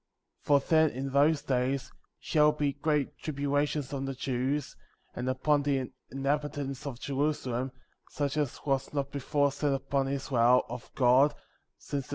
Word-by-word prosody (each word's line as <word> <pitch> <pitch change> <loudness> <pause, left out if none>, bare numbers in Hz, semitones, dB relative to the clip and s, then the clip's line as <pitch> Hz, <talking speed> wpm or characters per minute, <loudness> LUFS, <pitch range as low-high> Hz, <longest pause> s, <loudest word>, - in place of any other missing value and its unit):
For 145 -1 +4
then, 160 +2 +3
in 135 +1 -4
those 145 +2 +3
days, 130 +1 -1 0.3
shall 150 -1 +3
be 145 -2 0
great 145 0 -1
tribu 140 -2 -3
lations 145 -1 0
on 135 -1 -2
the 135 0 -4
Jews, 130 +2 -2 0.4
and 125 +1 -2
upon 145 +3 +2
the 135 -3 -1 0.2
inhabitants* 140 0 -2
of 125 -4 -6
Jerusalem, 135 -3 -1 0.4
such 145 -1 -2
as 150 -4 -2
was 135 -2 0
not 140 -1 -1
before 145 +1 +1
sent 140 0 0
upon 135 0 -1
Israel, 125 -3 +3
of 120 0 -7
God, 135 +3 +5 0.4
since 140 -2 -4
the. - - -19
140 Hz, 155 wpm, -29 LUFS, 130-145 Hz, 0.4 s, God